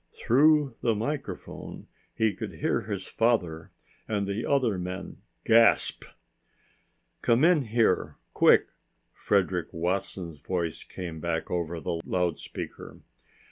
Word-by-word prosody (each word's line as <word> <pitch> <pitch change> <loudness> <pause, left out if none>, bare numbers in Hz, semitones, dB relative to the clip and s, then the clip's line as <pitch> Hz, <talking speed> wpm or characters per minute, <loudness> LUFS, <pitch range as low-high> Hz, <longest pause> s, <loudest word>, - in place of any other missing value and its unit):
Through 145 0 +3
the 115 -2 +2
microphone 135 +8 -5 0.3
he 110 -2 +2
could - - -6
hear - - 0
his - - -5
father 90 -9 0 0.4
and 105 -2 -1
the 100 +3 -3
other 125 -9 +2
men 90 +1 -6 0.3
gasp. 115 0 +4 1.2
"Come 120 +4 +3
in 165 -5 +4
here 110 -4 +1 0.2
quick," - - +5 0.4
Frederick 90 -4 0
Watson's 85 -1 -3
voice 85 -2 -3
came 85 -3 -7
back 80 0 -2
over 85 -1 -2
the 85 0 -3
loudspeaker. 90 -3 -4
100 Hz, 110 wpm, -27 LUFS, 85-115 Hz, 1.2 s, quick